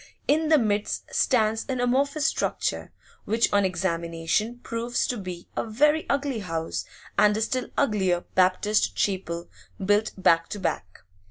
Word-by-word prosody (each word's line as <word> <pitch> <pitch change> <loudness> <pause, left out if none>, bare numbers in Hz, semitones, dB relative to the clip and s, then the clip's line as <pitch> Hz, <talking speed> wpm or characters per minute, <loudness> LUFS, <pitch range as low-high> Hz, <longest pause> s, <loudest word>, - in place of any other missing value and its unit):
In 310 +1 +2
the 315 - +6
midst 210 -4 -1
stands 225 -3 +2
an 255 -1 -1
amorphous 280 +5 +1
structure, - - -1 0.3
which 225 +3 +1
on 200 0 +4
examination 170 +4 -1
proves 235 +1 -1
to 250 - -2
be 180 -5 -7
a - - 0
very 295 +8 +2
ugly 280 -4 0
house 165 -4 -3 0.3
and 210 0 +5
a - - -1
still 255 +3 -1
uglier 190 -9 +2
Baptist 190 +3 +2
chapel 175 -3 -2 0.3
built 205 +3 +1
back 165 -3 +3
to 205 - -5
back. 95 - -4
210 Hz, 145 wpm, -26 LUFS, 185-245 Hz, 0.3 s, the